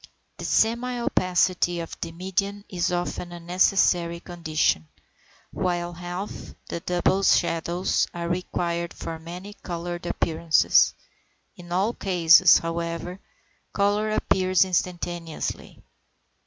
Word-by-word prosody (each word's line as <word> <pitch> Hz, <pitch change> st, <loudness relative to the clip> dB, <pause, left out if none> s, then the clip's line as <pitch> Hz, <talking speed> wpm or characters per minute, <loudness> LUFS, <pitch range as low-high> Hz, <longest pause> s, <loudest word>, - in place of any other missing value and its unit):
The -, -, -6 dB
semi 235 Hz, +3 st, +1 dB
opacity 180 Hz, -4 st, +1 dB
of 165 Hz, -, -6 dB
the 165 Hz, -, -4 dB
medium 195 Hz, +4 st, -3 dB
is 180 Hz, -1 st, -1 dB
often 175 Hz, 0 st, -3 dB
a 175 Hz, -, -8 dB
necessary 175 Hz, -1 st, +2 dB
condition; 160 Hz, -, -1 dB, 0.6 s
while 175 Hz, -2 st, -2 dB
half, 175 Hz, +3 st, -7 dB, 0.2 s
and 170 Hz, -, -5 dB
double 180 Hz, +2 st, +2 dB
shadows, 175 Hz, -1 st, +2 dB
are 170 Hz, -1 st, -4 dB
required 170 Hz, -1 st, -2 dB
for 165 Hz, -1 st, -6 dB
many 180 Hz, +5 st, -9 dB
coloured 175 Hz, -2 st, -6 dB
appearances. 165 Hz, -1 st, +3 dB, 0.6 s
In 175 Hz, -1 st, -13 dB
all 195 Hz, +6 st, +1 dB
cases, 175 Hz, -3 st, +6 dB
however, 170 Hz, +2 st, -4 dB, 0.5 s
colour 205 Hz, +1 st, +1 dB
appears 185 Hz, -3 st, +2 dB
instantaneously. 175 Hz, -2 st, -3 dB
175 Hz, 105 wpm, -25 LUFS, 170-185 Hz, 0.6 s, cases